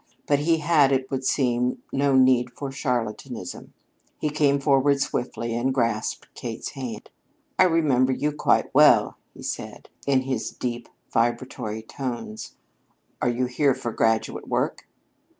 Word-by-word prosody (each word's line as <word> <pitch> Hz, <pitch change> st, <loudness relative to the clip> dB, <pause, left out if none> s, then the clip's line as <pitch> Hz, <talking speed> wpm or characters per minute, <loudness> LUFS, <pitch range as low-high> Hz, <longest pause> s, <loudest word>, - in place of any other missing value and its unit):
But 145 Hz, -1 st, +2 dB
he 165 Hz, +2 st, +2 dB
had, 150 Hz, -3 st, +4 dB
it 130 Hz, 0 st, 0 dB
would 135 Hz, -1 st, -2 dB
seem, 125 Hz, -2 st, 0 dB
no 140 Hz, 0 st, +2 dB
need 130 Hz, -1 st, +4 dB
for 140 Hz, -2 st, -5 dB
charlatanism. 125 Hz, -6 st, -4 dB, 0.5 s
He 150 Hz, -, -2 dB
came 145 Hz, -2 st, +2 dB
forward 140 Hz, 0 st, +3 dB
swiftly 115 Hz, -3 st, -2 dB
and 125 Hz, +3 st, 0 dB
grasped 115 Hz, -4 st, -1 dB
Kate's 115 Hz, -2 st, -5 dB
hand. 125 Hz, -6 st, -7 dB, 0.5 s
"I 185 Hz, -, +8 dB
remember 145 Hz, -7 st, +3 dB
you 150 Hz, +3 st, 0 dB
quite 150 Hz, -, +1 dB
well," -, -, +5 dB, 0.2 s
he -, -, -11 dB
said -, -, -6 dB, 0.2 s
in 135 Hz, -2 st, +3 dB
his 130 Hz, -3 st, -2 dB
deep, 120 Hz, -1 st, -5 dB, 0.2 s
vibratory 115 Hz, -2 st, -1 dB
tones. 120 Hz, -3 st, -6 dB, 0.7 s
"Are 125 Hz, -, +2 dB
you 120 Hz, +1 st, 0 dB
here 130 Hz, +2 st, +2 dB
for 120 Hz, -3 st, -4 dB
graduate 110 Hz, 0 st, 0 dB
work?" -, -, -1 dB
130 Hz, 140 wpm, -25 LUFS, 120-140 Hz, 0.7 s, I